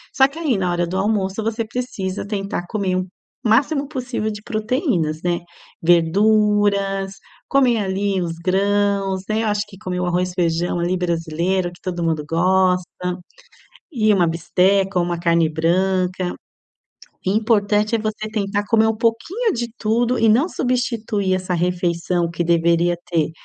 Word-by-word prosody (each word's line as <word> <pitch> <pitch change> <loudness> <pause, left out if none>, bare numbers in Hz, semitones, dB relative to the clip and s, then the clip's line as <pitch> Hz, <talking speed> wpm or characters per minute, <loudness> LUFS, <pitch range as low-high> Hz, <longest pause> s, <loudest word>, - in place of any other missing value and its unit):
Só 265 - +6
que 280 +4 -13
aí, 290 -9 +1
na 180 -2 0
hora 175 0 0
do 185 - -3
almoço, 195 0 0
você 225 +1 -1
precisa 215 -6 -4
tentar 195 -3 -3
comer 195 -4 -1
o 185 0 -2 0.4
máximo 275 +6 +2
possível 250 -6 -3
de 210 - -8
proteínas, 215 - -1
né. 175 -1 0 0.4
Verduras, 195 +3 +2 0.4
comer 255 -5 +3
ali 195 0 -1
os 170 -1 -2
grãos, 195 +1 +1
né. 220 +1 +1
Eu - - 0
acho 205 -1 +1
que 195 - -14
comer 180 -2 -4
o 180 - 0
arroz, 180 +1 0
feijão 175 0 0
ali 175 +2 0
brasileiro, 175 +1 -1
que 175 - -18
todo 180 -2 -4
mundo 160 -2 0
gosta, 180 +2 +2 1.1
e 215 -4 +3
uma 180 -4 +3
bisteca 185 +3 +1
ou 175 - +2
uma 175 -1 -2
carne 170 -1 +2
branca. 180 +3 0 0.9
Importante 210 +1 +2
é 225 - 0
você 215 0 -3
tentar 205 -1 -1
comer 220 -1 +4
um 225 - +1
pouquinho 330 - 0
de 235 -3 -2
tudo 235 +3 +1
e 225 -1 +4
não 250 +10 +4
substituir 230 - -1
essa 185 0 -3
refeição 175 0 0
que 170 +1 -2
deveria 170 +1 +2
ter 160 -2 +1
195 Hz, 155 wpm, -20 LUFS, 175-215 Hz, 1.1 s, Só